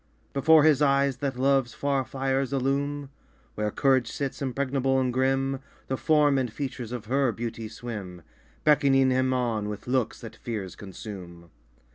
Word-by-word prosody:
Before 155 +3 +6
his 150 -2 +4
eyes 140 -2 +3
that 135 -1 -3
love's 135 -2 +2
far 140 -1 0
fires 135 0 -1
illume 140 +1 -1 0.4
Where 105 0 -1
courage 130 +1 +2
sits, 140 0 -4
impregnable 135 0 0
and 130 -1 0
grim 135 +1 +1 0.3
The 130 - +1
form 150 -1 +3
and 125 -3 -2
features 125 -2 -5
of 120 -3 -5
her 135 +2 +2
beauty 115 0 -5
swim, 105 -6 -7 0.4
Beckoning 135 -3 +4
him 130 0 +2
on 115 -5 0
with 105 -1 -6
looks 125 -2 0
that 115 - -9
fears 105 -6 -5
consume. 90 -4 -9
130 Hz, 150 wpm, -27 LUFS, 115-140 Hz, 0.4 s, Before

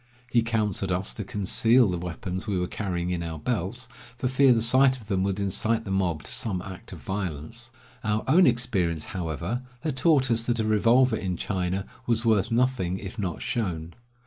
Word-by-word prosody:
He 120 - +4
counseled 105 -4 -1
us 90 +2 -1
to 105 - -5
conceal 110 +5 +3
the 90 - -2
weapons 90 +3 -5
we 100 -3 0
were 90 - 0
carrying 90 -2 -3
in 90 -1 -1
our 80 -1 -4
belts, 115 +6 -3 0.3
for 125 - -1
fear 130 +1 +5
the 120 - +4
sight 130 +2 +5
of 110 - -14
them 95 -1 +1
should 100 0 -2
incite 110 +3 0
the 95 - -5
mob 90 -5 0
to - - -1
some 100 -5 +1
act 95 -2 -9
of - - -7
violence. 95 - -4 0.3
Our 105 0 0
own 170 +6 +6
experience, 100 -10 +1
however, 90 - -3 0.2
had 155 -3 -2
taught 135 -3 +3
us 115 0 +3
that 120 -1 0
a 110 - +1
revolver 115 +3 +4
in 90 -3 -3
China 95 0 -2 0.2
was 115 -1 +1
worth 105 -4 +3
nothing 115 -7 +1
if 95 +3 -8
not 90 -5 -3
shown. 85 -7 -3
105 Hz, 195 wpm, -26 LUFS, 90-120 Hz, 0.3 s, own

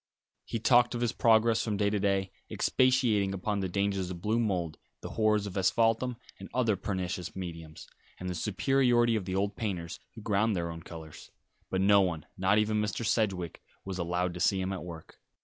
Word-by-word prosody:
He - - -3
talked 120 +2 +4
of 120 - -3
his 120 -2 +1
progress 115 0 +3
from 105 -3 -1
day 100 0 +1
to 105 - 0
day, 95 -1 0 0.2
expatiating 120 -7 +2
upon 100 +2 -2
the 95 -1 -2
dangers 100 -1 -1
of 90 -2 -6
blue 110 +6 0
mould, 90 -8 -1 0.2
the - - -6
horrors 105 -2 +2
of 100 - -6
asphaltum 115 +6 +2 0.2
and - - -9
other 115 -5 +2
pernicious 95 -2 -4
mediums, 80 -4 -7 0.3
and 90 - -5
the 90 - -2
superiority 120 +5 +2
of 105 -4 -2
the 95 0 -3
old 100 +1 0
painters, 90 -7 -4 0.2
who 110 - -9
ground 105 +1 +1
their 85 -1 -2
own 80 0 -8
colours; 80 -2 -10 0.4
but 95 - 0
no 100 +1 +6
one, 80 -5 -1
not 95 +2 +2
even 105 0 +2
Mr. 105 +2 -2
Sedgewick, 100 -7 0 0.2
was 95 -1 -5
allowed 90 +1 -1
to 90 - -7
see 95 +2 +2
him 95 +1 -2
at 95 - -5
work. 85 -2 -10
100 Hz, 195 wpm, -30 LUFS, 90-110 Hz, 0.4 s, no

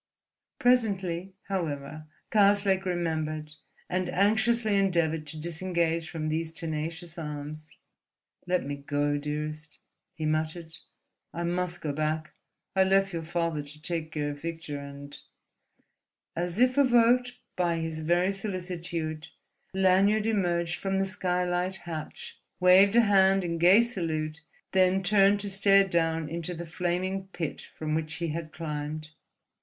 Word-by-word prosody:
Presently, 195 -7 +1
however, 155 -5 -4 0.2
Karslake 200 -2 +4
remembered, 155 -4 -2 0.3
and 185 -1 -1
anxiously 220 +3 +2
endeavoured 170 -5 +1
to 155 - -5
disengage 170 0 -1
from 155 -2 -4
these 160 +1 -1
tenacious 165 +1 -5
arms. 150 0 -6 0.8
"Let 180 -4 +1
me 145 0 -4
go, 145 +1 0
dearest," 150 +1 -5 0.4
he 155 - -4
muttered. 160 +1 -2 0.6
"I 170 - -2
must 175 0 -2
go 150 -2 -2
back—I 155 +5 -2
left 195 0 +2
your 165 - -2
father 165 -1 -1
to 145 +1 -12
take 160 0 -3
care 145 -1 -1
of 145 0 -9
Victor, 160 -3 -5
and—" 140 0 -9 1.2
As 175 +2 -2
if 255 +3 +4
evoked 245 -1 +4 0.2
by 175 -2 +1
his 160 -1 -3
very 175 +4 +2
solicitude 175 -5 -4 0.4
Lanyard 190 +3 +3
emerged 175 -5 0
from 195 -1 -1
the 195 - +2
skylight 180 -1 -1
hatch, 165 -4 -7 0.2
waved 190 +3 +6
a 235 - +8
hand 195 -2 +4
in 170 -1 -2
gay 185 +7 +7
salute, 160 -8 -3 0.3
then 190 0 +3
turned 200 +1 +4
to 200 - -3
stare 195 0 +5
down 165 -3 +1
into 170 +2 -4
the 170 +1 -6
flaming 180 +3 -2
pit 170 -5 -5
from 155 -1 -2
which 155 +1 -2
he 170 -2 -2
had 155 0 -4
climbed. 155 -1 -5
170 Hz, 130 wpm, -28 LUFS, 155-190 Hz, 1.2 s, a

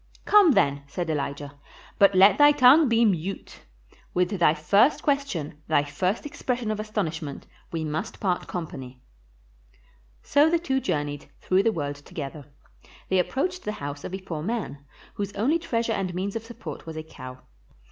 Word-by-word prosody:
"Come, 405 -7 +6
then," 140 - +2
said 165 +3 -3
Elijah; 140 -1 -4 0.4
"but 200 -1 +6
let 195 +7 +6
thy 290 0 +8
tongue 285 +1 +6
be 230 0 +4
mute. 195 -1 -2 0.6
With 180 0 +2
thy 175 -6 +3
first 200 - +3
question, 190 - -2
thy 155 -2 +3
first 180 - -2
expression 250 -5 -3
of 215 - -3
astonishment, 165 -9 -4 0.3
we 165 -1 -3
must 155 +8 -4
part 185 -3 -1
company." 130 -7 -6 1.2
So 295 +2 +4
the 340 - +3
two 270 -6 -1
journeyed, 145 - -3
through 185 +1 +2
the 225 - +2
world 145 -6 -4
together. 145 0 -8 0.6
They 190 - +3
approached 360 - -1
the 210 - -3
house 145 -5 -6
of 185 - -5
a - - -6
poor 165 -5 -6
man, 205 -6 -3 0.3
whose 200 -1 -4
only 270 +12 +1
treasure 235 -8 -1
and 185 -4 -3
means 195 +3 -3
of 225 - -3
support 235 -6 -9
was 160 -1 -6
a 155 - -4
cow. 130 -4 -11
185 Hz, 165 wpm, -25 LUFS, 150-230 Hz, 1.2 s, thy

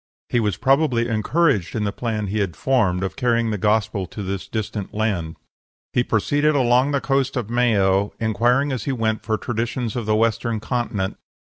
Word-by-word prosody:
He 120 - +2
was 105 -5 0
probably 130 -1 +2
encouraged 115 - +1
in 110 - 0
the 100 - 0
plan 110 -1 -3
he 105 +2 -2
had 95 -6 -1
formed 105 -9 +1
of 95 - -3
carrying 115 -3 +1
the 105 - -2
Gospel 105 -2 +1
to 105 - -7
this 95 0 -4
distant 105 -3 -4
land. 95 -7 -1 0.6
"He 120 - +3
proceeded 145 +8 +1
along 125 0 +3
the 140 -1 +1
coast 135 -1 0
of 115 -2 -3
Mayo, 100 -5 +2
inquiring 120 +6 +2
as 130 - -3
he 140 - 0
went 110 -3 -1
for 110 -1 -1
traditions 120 0 -3
of 120 -3 -3
the 110 - +3
Western 115 0 +1
continent. 110 -5 -2
115 Hz, 185 wpm, -22 LUFS, 105-125 Hz, 0.6 s, He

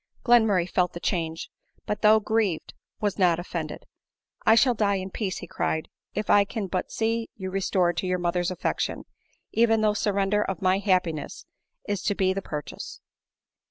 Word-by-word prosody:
Glenmurray 220 -7 +4
felt 180 -1 +1
the 170 - -6
change, 165 -3 -2 0.3
but 210 0 -3
though 215 0 +6
grieved, 215 -6 -1 0.3
was 205 -1 -1
not 175 -3 +4
offended; 175 - -5 0.3
" - - -34
I 220 - +8
shall 250 +2 +5
die 205 -3 +1
in 190 0 -4
peace," 195 -3 -3
be - - -6
cried, 160 - -2
" - - -48
if 210 +1 -2
I 205 - +6
can 205 +1 -4
but 185 -1 -3
see 225 +1 -1
you 190 -2 -5
restored 185 -2 +1
to 185 - -1
your 180 0 +1
mother's 175 0 0
affection, 185 -2 -2 0.5
even 225 -1 +3
though 215 -1 +4
the - - -5
surrender 200 0 +1
of 195 -3 -2
ray 185 +1 +2
happiness 180 -6 -1 0.4
is 205 -2 -1
to 205 - 0
be 190 -1 +2
the 195 - -3
pur 150 -5 -4
chase." - - -9
195 Hz, 190 wpm, -26 LUFS, 180-210 Hz, 0.5 s, I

